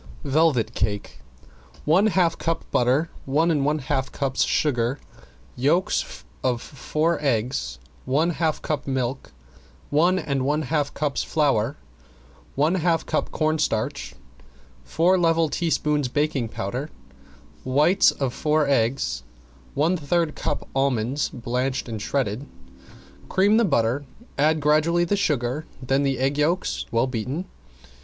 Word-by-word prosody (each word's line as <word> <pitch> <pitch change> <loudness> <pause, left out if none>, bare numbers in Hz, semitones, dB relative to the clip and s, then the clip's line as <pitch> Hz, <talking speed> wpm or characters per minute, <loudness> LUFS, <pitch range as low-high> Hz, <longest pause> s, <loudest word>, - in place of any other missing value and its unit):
~VELVET 135 -7 +2
CAKE~ 105 -8 -3 0.7
One 180 +8 +4
half 180 -5 +2
cup 165 -1 -2
butter, 130 +7 +2
one 155 +5 +2
and 145 -4 +1
one 150 +2 +1
half 135 -1 -2
cups 135 -2 0
sugar, 130 -2 0 0.6
yolks 150 +9 +2 0.6
four 155 +7 -1
eggs, 120 - -1 0.3
one 150 +7 +2
half 160 -2 -1
cup 150 -3 -2
milk, 130 -1 -2 0.6
one 170 +6 +3
and 140 -6 -1
one 150 +3 +1
half 145 0 0
cups 145 -2 -1
flour, 140 -4 +1 0.8
one 150 +5 +2
half 165 -1 +1
cup 155 - -1
cornstarch, 145 - -1 0.7
four 180 +3 +2
level 165 -2 +3
teaspoons 150 -4 0
baking 140 -3 -1
powder, 125 +10 -4 0.7
whites 150 +9 +4 0.2
four 150 +2 +1
eggs, 135 -1 +1 0.5
one 160 +6 +2
third 160 +1 0
cup 145 - -3
almonds 135 0 0
blanched 125 +1 -2
shredded. 130 +1 -2 0.8
Cream 200 +3 +4
the 235 - +4
butter, 135 - +1 0.3
add 155 +2 +2
gradually 155 +4 +3
the 175 +4 +1
sugar, 150 -6 -1
then 135 +2 +1
the 135 -2 0
egg 135 +3 0
yolks 170 +5 0
well 115 +2 +2
beaten. 130 - -3
145 Hz, 120 wpm, -24 LUFS, 130-160 Hz, 0.8 s, One